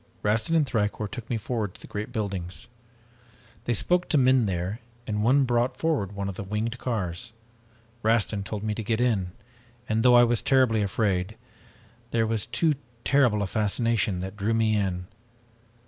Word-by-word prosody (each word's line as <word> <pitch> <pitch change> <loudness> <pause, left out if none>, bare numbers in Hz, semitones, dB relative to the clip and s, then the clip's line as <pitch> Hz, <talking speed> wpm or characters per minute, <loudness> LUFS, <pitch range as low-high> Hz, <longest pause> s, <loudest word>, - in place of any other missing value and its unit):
"Rastin 115 +11 +2
and 155 -3 +3
Thicourt 105 -2 -1
took 120 -1 -7
me 120 - 0
forward 110 -3 -3
to - - -15
the - - -9
great 105 +3 -5
buildings. 95 -7 -4 1.0
They 120 - +1
spoke 180 +9 +1
to 155 - +3
men 130 -3 +4
there 95 +4 -2 0.3
and 105 -1 -1
one 135 +5 +4
brought 120 0 +1
forward 145 - 0
one 100 -1 -3
of 100 - -3
the 95 - -6
winged 110 +4 -3
cars. 110 -1 -3 0.7
Rastin 110 -2 +1
told 105 +1 -5
me 110 -1 -1
to 110 - -4
get 110 +2 0
in, 105 -8 +1 0.5
and 110 0 +1
though 125 +1 +6
I 120 - +8
was 120 -1 +2
terribly 130 -5 +3
afraid, 100 -1 0 0.7
there 115 -1 +1
was 110 -1 -1
too 120 +7 +2 0.3
terrible 125 -8 +3
a - - 0
fascination 105 -1 0
that 95 +2 -6
drew 105 +2 0
me 110 -1 +2
in. 95 -3 -1
110 Hz, 175 wpm, -26 LUFS, 100-120 Hz, 1.0 s, I